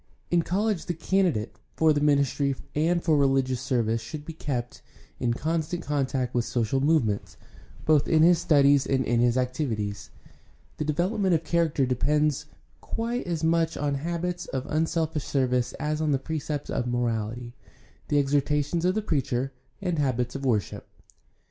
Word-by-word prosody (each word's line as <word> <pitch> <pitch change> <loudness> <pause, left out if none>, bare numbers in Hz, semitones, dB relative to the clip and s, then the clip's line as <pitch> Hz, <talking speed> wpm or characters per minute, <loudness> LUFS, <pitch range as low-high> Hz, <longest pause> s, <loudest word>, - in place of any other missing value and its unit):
— - - -40
In 170 - +5
college 200 +2 -1
the 175 - -1
candidate 165 - 0 0.2
for 160 -1 +4
the 145 - 0
ministry 140 -1 +2 0.2
and 170 +3 +1
for 160 -3 +3
religious 135 -3 +2
service 115 -4 0
should 145 +7 -7
be 165 - -6
kept 125 -6 -4 0.4
in 120 - +1
constant 160 +6 -2
contact 135 -3 -1
with 120 - +1
social 120 +3 0
movements, 135 -9 +1 0.5
both 155 -2 +4
in 155 -1 +4
his 170 0 +6
studies 140 -4 +4
and 130 -2 +1
in 120 - +1
his 120 +1 +3
activities. 110 -6 -2 0.7
The 155 - -2
development 180 +5 +1
of 160 - -1
character 160 -4 +1
depends 150 +3 +1 0.3
quite 235 -1 -3
as 165 -2 -2
much 165 0 +2
on 145 -1 -1
habits 170 +4 -3
of 130 0 -3
unselfish 160 -1 -1
service 125 -3 0
as 150 +1 -2
on 155 - +1
the - - +3
precepts 150 +1 -4
of 125 -2 -1
morality, 120 0 -2 0.5
the 145 - +1
exhortations 145 +3 +1
of 185 +2 +2
the 215 - -1
preacher, 135 -5 -1 0.3
and 175 -4 -1
habits 125 -4 0
of 140 - -5
worship. 110 -7 -1
145 Hz, 160 wpm, -26 LUFS, 125-160 Hz, 0.7 s, his